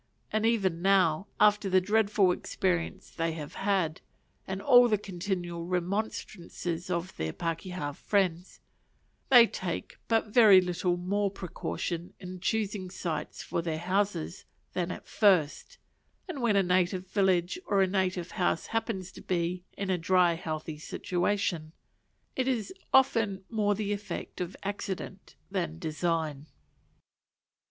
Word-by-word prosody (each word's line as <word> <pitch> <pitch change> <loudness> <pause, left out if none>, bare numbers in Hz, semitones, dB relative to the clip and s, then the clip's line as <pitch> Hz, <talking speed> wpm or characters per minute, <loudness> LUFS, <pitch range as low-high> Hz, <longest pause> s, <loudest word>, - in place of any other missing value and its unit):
And 215 +1 +2
even 190 -7 +1
now, 190 -2 +3
after 210 -1 +4
the 185 0 +5
dreadful 205 -1 +3
experience 180 -1 -2
they 165 -1 -1
have 150 -2 -7
had, 190 -5 0 0.5
and 190 0 -3
all 245 +2 +7
the 215 -2 +2
continual 175 -3 -4
remonstrances 180 -2 -3
of 175 +1 -2
their 80 0 -2
pakeha 165 - -4
friends, 185 0 -1 0.7
they 245 -3 +9
take 180 -6 -5
but 225 -2 +1
very 215 -6 +8
little 180 0 0
more 200 +3 0
precaution 175 -2 -5
in 185 0 -8
choosing 205 -1 -1
sites 160 -4 -4
for - - -2
their 165 -2 -2
houses 185 0 -1 0.3
than 180 -1 -1
at - - -6
first; 185 -9 +2 0.5
and 320 -8 -5
when 230 -4 +3
a 195 - +4
native 180 +1 +1
village 190 - +1
or 195 -1 +3
a - - +2
native 185 -2 -1
house 175 -2 0
happens 195 -5 -2
to - - -12
be 180 0 -2
in 195 -1 -2
a 180 - +1
dry 180 0 +4
healthy 155 -2 -5
situation, 175 -1 -1 0.6
it 260 -1 0
is 255 - -1 0.2
often 225 -7 +3
more 205 -2 +2
the 205 0 -1
effect 205 -2 -6
of 180 0 -4
accident 195 -1 -5 0.2
than 170 -5 -2
design. 160 -3 -2
185 Hz, 135 wpm, -29 LUFS, 170-205 Hz, 0.7 s, they